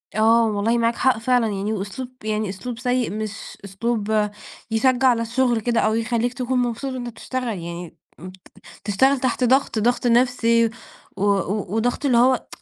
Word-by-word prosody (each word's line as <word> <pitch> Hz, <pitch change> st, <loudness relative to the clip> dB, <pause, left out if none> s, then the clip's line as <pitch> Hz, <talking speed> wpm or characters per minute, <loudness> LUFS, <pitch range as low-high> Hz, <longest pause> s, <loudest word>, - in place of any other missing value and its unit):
آه، 225 Hz, +1 st, +4 dB
والله 215 Hz, +3 st, 0 dB
معاك 230 Hz, 0 st, +1 dB
حق 260 Hz, -3 st, +2 dB
فعلًا، 245 Hz, 0 st, +2 dB
يعني 205 Hz, +1 st, -2 dB
وأسلوب 220 Hz, +6 st, -5 dB
يعني 215 Hz, -1 st, -1 dB
أسلوب 230 Hz, +5 st, -6 dB
سيِّئ، 250 Hz, -1 st, 0 dB
مش 215 Hz, 0 st, -6 dB
أسلوب 215 Hz, +1 st, -1 dB, 0.4 s
يشجِّع 255 Hz, +3 st, +3 dB
على 235 Hz, -2 st, +3 dB
الشغل 240 Hz, 0 st, +1 dB
كده، 235 Hz, +1 st, +1 dB
أو 215 Hz, +1 st, +2 dB
يخلِّيك 235 Hz, +1 st, 0 dB
تكون 255 Hz, 0 st, -1 dB
مبسوط 245 Hz, +2 st, -2 dB
وأنتَ 245 Hz, -2 st, -5 dB
بتشتغَل، 250 Hz, +2 st, -5 dB
يعني 170 Hz, 0 st, -8 dB, 0.2 s
ابت 185 Hz, +3 st, -10 dB, 0.5 s
بتشتغَل 265 Hz, +7 st, +2 dB
تحت 255 Hz, 0 st, 0 dB
ضغط، 260 Hz, -2 st, +2 dB
ضغط 245 Hz, +3 st, +1 dB
نفسي 235 Hz, -1 st, +3 dB, 0.5 s
و 195 Hz, -, -2 dB
و 200 Hz, 0 st, 0 dB
وضغط 245 Hz, +5 st, -1 dB
اللي 250 Hz, -4 st, +3 dB
هو 255 Hz, +2 st, +3 dB
230 Hz, 160 wpm, -22 LUFS, 215-250 Hz, 0.5 s, آه